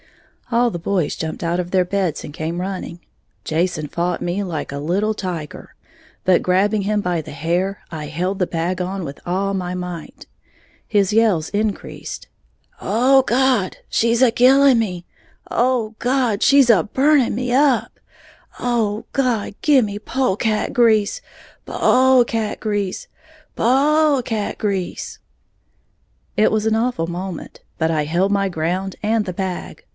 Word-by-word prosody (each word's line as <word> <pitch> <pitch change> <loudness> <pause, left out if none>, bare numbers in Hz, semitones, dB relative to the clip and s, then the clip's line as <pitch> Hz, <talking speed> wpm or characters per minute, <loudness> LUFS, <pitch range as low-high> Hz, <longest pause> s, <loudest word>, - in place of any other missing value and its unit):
All 240 +1 +3
the 175 - -5
boys 180 -2 -1
jumped 160 +1 -5
out 170 +2 0
of 175 0 -8
their 185 -1 +3
beds 185 -4 -2
and 145 - -9
came 165 +2 -4
running. 185 -2 -5 0.5
Jason 160 -1 -1
fought 170 +4 -2
me 180 +4 -1
like 160 -6 -4
a 140 - -4
little 195 +8 0
tiger; 175 -7 -6 0.5
but 185 -1 +4
grabbing 200 +3 +2
him 210 +1 0
by 175 -4 -1
the - - -10
hair, 175 +7 -1
I 155 -2 -6
held 180 +6 -2
the 180 - +1
bag 175 +2 -2
on 185 0 -3
with 140 -1 -8
all 195 +3 -1
my 180 -2 -3
might. 180 -3 -7 0.6
His 205 -2 +1
yells 210 -8 +3
increased. 210 0 -4 0.5
"Oh, 255 +6 +4
God, 255 -6 +1
she's 230 +1 +1
a 255 - +6
killing 265 +2 +5
me! 180 -6 -3 0.4
Oh, 235 -3 0
God, 245 -4 +1
she's 275 -3 +5
a 200 -8 +5
burning 270 +1 +2
me 245 +1 -2
up! 270 -2 +2 0.6
Oh, 225 -3 -1
God, 245 -7 0
gimme 235 -9 +3
pole 255 -1 0
cat 215 0 -1
grease, 220 -4 +3 0.4
pole 260 -1 +4
cat 225 -2 -3
grease, 205 -3 -2 0.5
po 295 +5 +3
ole 265 - 0
cat 220 -3 -3
grease!" 195 -4 -3 1.2
It 210 +1 +3
was 215 0 0
an 220 0 +2
awful 225 -8 0
moment; 180 +1 -6 0.2
but 160 0 +1
I 155 -2 +1
held 175 +6 +1
my 195 -1 +1
ground 180 +3 -2
and 220 +1 +1
the 185 -3 -5
bag. 185 0 -5
200 Hz, 150 wpm, -20 LUFS, 180-235 Hz, 1.2 s, a